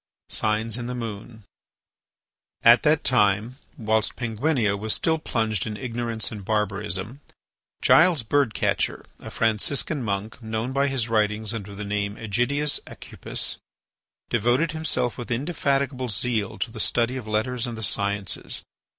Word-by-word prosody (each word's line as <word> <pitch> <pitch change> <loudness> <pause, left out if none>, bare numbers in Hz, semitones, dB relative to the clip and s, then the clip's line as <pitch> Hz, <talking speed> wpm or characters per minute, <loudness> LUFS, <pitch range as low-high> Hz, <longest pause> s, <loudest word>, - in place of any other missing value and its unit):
SIGNS 110 +2 0
IN 120 - -4
THE 125 - -3
MOON 110 -1 -6 1.2
At 120 +1 +8
that 155 0 +3
time, 110 +1 +2 0.2
whilst 110 -3 +1
Penguinia 115 -2 +1
was 105 +2 0
still 160 -1 +1
plunged 110 -9 -1
in 105 -1 -4
ignorance 115 -1 -2
and 105 -3 -7
barbarism, 105 +3 -2 0.6
Giles 165 -7 +6
Bird 140 0 +2
catcher, - - 0
a - - -8
Franciscan 115 +6 0
monk, 105 +1 -3
known 110 +3 -3
by 140 +1 +2
his 130 -4 -1
writings 110 -1 +1
under 100 -3 -6
the 105 +1 -5
name 100 0 -1
Ægidius 125 +8 0
Aucupis, - - -4 0.7
devoted 130 +7 +2
himself 150 -7 -1
with 120 - -6
indefatigable 135 -1 0
zeal 110 -1 -1
to 115 - -2
the 110 - -8
study 120 +3 +1
of 125 -4 -6
letters 115 +3 0
and 115 -2 -5
the 110 - -4
sciences. 100 -1 -1
115 Hz, 140 wpm, -25 LUFS, 105-130 Hz, 1.2 s, At